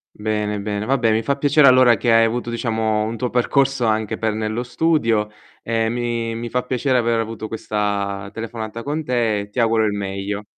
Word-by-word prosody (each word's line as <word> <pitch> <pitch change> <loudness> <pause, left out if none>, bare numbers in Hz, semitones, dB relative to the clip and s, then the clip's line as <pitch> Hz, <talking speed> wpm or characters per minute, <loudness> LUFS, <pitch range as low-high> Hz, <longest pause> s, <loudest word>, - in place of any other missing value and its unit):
Bene, 105 -1 -2
bene, 105 0 -3
va 135 +2 +1
bene, 115 -2 +2
mi 110 - 0
fa 140 0 0
piacere 145 0 +4
allora 130 -2 +6
che 120 -2 +2
hai 115 0 +6
avuto 120 +1 -1
diciamo 110 -2 0
un 115 +1 -4
tuo 125 0 -2
percorso 135 +1 +1
anche 110 -1 0
per 110 -1 0
nello 110 +2 -2
studio 120 -5 +1 0.4
e 115 -1 0
mi 120 -1 -2
mi 120 +1 -5
fa 125 - +1
piacere 130 0 0
aver 115 -1 +1
avuto 110 0 -4
questa 100 -2 -2
telefonata 115 0 -6
con 150 +4 -3
te 120 -5 0
e 100 0 -7
ti 105 - -5
auguro 115 -1 +3
il 105 - 0
meglio. 100 +1 -4
115 Hz, 200 wpm, -20 LUFS, 110-120 Hz, 0.4 s, allora